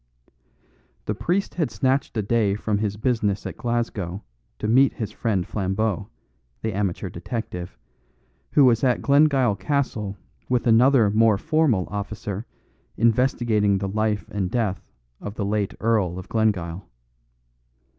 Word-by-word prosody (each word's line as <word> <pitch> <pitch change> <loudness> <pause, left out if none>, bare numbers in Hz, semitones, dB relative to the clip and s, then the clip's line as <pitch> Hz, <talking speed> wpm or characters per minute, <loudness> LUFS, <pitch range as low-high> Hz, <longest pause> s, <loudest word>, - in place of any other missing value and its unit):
The 105 - -1
priest 180 - -1
had 160 -5 -1
snatched 130 -2 0
a 110 - +1
day 105 -2 +1
from 105 -1 -1
his 105 -1 -2
business 110 -4 0
at - - -5
Glasgow 110 -5 -3 0.3
to 105 - -3
meet 130 +4 +4
his 110 - -4
friend 100 -6 -1
Flambeau, 100 0 -1 0.6
the 110 -1 -1
amateur 100 -1 -2
detective, 90 - -6 0.8
who 145 - +6
was 120 -1 +3
at 125 -2 +2
Glengyle 140 -6 +4
Castle 110 -9 -2 0.3
with 125 -1 +1
another 120 -1 +5
more 110 -1 +4
formal 130 - +1
officer 105 0 -5 0.5
investigating 115 -4 +2
the 100 0 -2
life 105 +1 -1
and 95 -3 -1
death 105 -5 -2 0.3
of 100 +1 -7
the 100 - -2
late 100 -1 -1
Earl 105 -6 +1
of 95 - -8
Glengyle. 100 -6 -1
110 Hz, 135 wpm, -24 LUFS, 100-120 Hz, 0.8 s, who